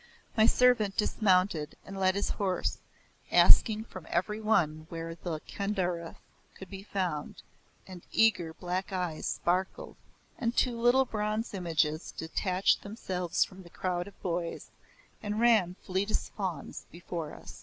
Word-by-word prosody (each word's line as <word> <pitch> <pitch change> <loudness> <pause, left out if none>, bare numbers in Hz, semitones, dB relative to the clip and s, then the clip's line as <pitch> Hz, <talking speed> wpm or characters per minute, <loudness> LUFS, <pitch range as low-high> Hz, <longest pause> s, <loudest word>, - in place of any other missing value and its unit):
My 220 0 +6
servant 235 -6 +4
dismounted 185 -7 +2
and 195 - -8
led 190 -1 +2
his 200 - 0
horse, 190 -3 -1 0.5
asking 220 -1 +6
from 185 -7 -11
every 210 +5 -1
one 160 -8 +1
where 165 0 -5
the 165 -2 -5
"Kedarnath" 180 -5 -2 0.4
could 190 0 -11
be 195 -1 -7
found, 185 -7 -3 0.4
and 185 -2 -10
eager 210 -7 +3
black 180 +4 -3
eyes 180 -4 -2
sparkled 190 - -1 0.4
and 235 -1 -1
two 250 -2 +3
little 250 +3 +5
bronze 215 0 -2
images 160 -4 0
detached 185 +3 +1
themselves 185 -5 -1
from 190 0 -13
the 175 - -14
crowd 175 0 -2
of 200 - -14
boys, 170 -2 -3 0.5
and 210 +1 -2
ran, 220 -7 +4
fleet 190 +3 -1
as - - -1
fauns, 180 -8 -5
before 170 -2 -6
us. - - -11
185 Hz, 140 wpm, -30 LUFS, 170-210 Hz, 0.5 s, My